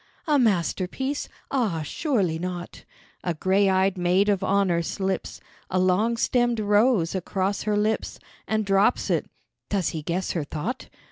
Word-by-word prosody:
"A 300 -4 +3
masterpiece? 220 - 0 0.2
Ah, 210 - 0
surely 190 - 0
not." 180 0 -6 0.4
A 175 -2 -1
grey 195 +4 +2
eyed 190 0 +2
maid 180 +3 +3
of 200 -2 +1
honour 190 -3 +2
slips 190 +2 -3 0.3
A 185 - 0
long 185 +6 +2
stemmed 240 -1 +1
rose 210 -3 +3
across 190 +1 -1
her 210 - +2
lips 215 +1 -1 0.3
And 215 -1 0
drops 195 +4 +2
it; - - 0 0.4
does 195 -6 0
he 160 - -4
guess 175 +5 -2
her 165 - -1
thought? 155 - -5
195 Hz, 145 wpm, -25 LUFS, 180-220 Hz, 0.4 s, A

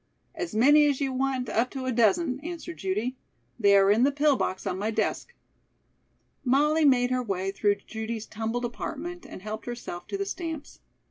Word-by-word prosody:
"As 340 -6 -5
many 295 +6 +6
as 280 -2 +1
you 270 -2 -1
want 260 -1 -1
up 230 +3 +1
to 265 -2 -5
a 255 - 0
dozen," 250 - +2
answered 340 +1 -7
Judy. 210 +7 -2 0.4
"They 200 0 +6
are 195 0 +5
in 215 +3 +3
the 275 +3 +4
pill 290 0 +3
box 190 -6 -2
on 185 - -2
my 210 +2 -1
desk." 480 - -2 1.1
Molly 300 +4 +3
made 250 -3 +4
her 255 0 +1
way 195 -4 -2
through 205 +1 +2
Judy's 220 0 -5
tumbled 225 +3 -3
apartment 330 +8 -6
and 185 - -10
helped 215 +2 -6
herself 235 -7 -6
to 395 - -3
the 395 - -2
stamps. 325 -6 -6
250 Hz, 185 wpm, -27 LUFS, 215-295 Hz, 1.1 s, many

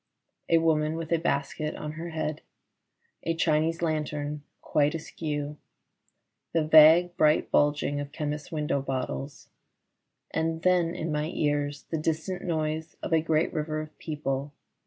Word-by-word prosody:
A 165 - +6
woman 160 -1 +2
with 165 -1 -5
a 170 - +3
basket 150 -1 -1
on 150 - -5
her 165 +2 -6
head: 155 -2 -3 0.8
a 165 - -1
Chinese 165 +1 +1
lantern 150 -2 -2 0.2
quite 150 +2 +1
askew: 150 -2 -4 1.0
the 165 -2 +2
vague 160 +3 +7
bright 155 0 +3
bulging 145 -1 +2
of 145 0 -5
chemists' 150 -1 -4
window 150 -3 0
bottles; 135 +1 -4 0.8
and 165 0 -1
then 175 -2 +3
in 160 0 -3
my 150 0 0
ears 145 -1 0
the 160 - 0
distant 165 +4 -2
noise 160 -1 -2
of - - -2
a 160 - +5
great 160 0 +1
river 155 0 -2
of 155 0 -7
people. 145 -2 -3
155 Hz, 140 wpm, -28 LUFS, 150-165 Hz, 1.0 s, vague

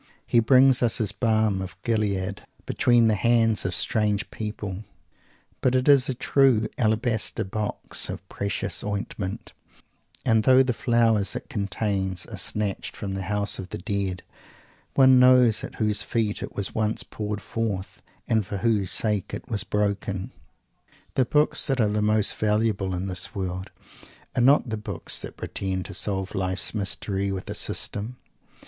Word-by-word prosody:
He 120 - +3
brings 130 +2 +5
us 120 -1 +2
his 110 -5 0
"Balm 110 -3 +1
of 95 0 -7
Gilead" 100 -4 -1 0.2
between 120 -2 +3
the 110 - +3
hands 115 +1 +2
of 90 -1 +2
strange 105 0 +1
people, 105 -2 -5 0.8
but 130 0 +2
it 130 +2 +1
is 140 -3 +5
a 130 - -1
true 130 -3 +3
"alabaster 110 -1 0
box 105 +2 -1
of - - -7
precious 100 0 -3
ointment," 100 -1 -4 0.7
and 110 -1 +4
though 130 +4 +6
the 125 -1 0
flowers 115 -4 +2
it - - -6
contains 100 -2 -2
are - - -8
snatched 105 -2 -2
from 100 -2 -5
the 95 - -3
House 105 +2 -1
of 95 -1 -7
the - - -5
Dead, 95 -2 -3 0.7
one 130 -1 +7
knows 125 -3 +5
at - - -7
whose 105 -2 0
feet 110 -1 -1
it - - -7
was 100 - -3
once 110 0 0
poured 105 -1 -5
forth, 100 0 -4 0.3
and 110 -1 +2
for 100 +1 -5
whose 105 -3 +1
sake 105 -3 0
it - - -10
was 105 -3 0
broken! 100 -2 -2 0.8
The 130 - +2
books 150 +4 +2
that 135 -2 0
are 110 - +4
the 105 +1 0
most 105 0 +3
valuable 105 -3 0
in 90 +2 -3
this 95 +1 -3
world 95 -1 -4 0.7
are - - +2
not 135 +2 +5
the 110 - -2
books 105 -1 -3
that - - -8
pretend 95 -1 -3
to - - -8
solve 95 -2 -1
life's 95 -2 0
mystery 100 -1 -1
with 95 -1 -5
a - - -2
system. 110 +5 -3
105 Hz, 160 wpm, -25 LUFS, 95-115 Hz, 0.8 s, one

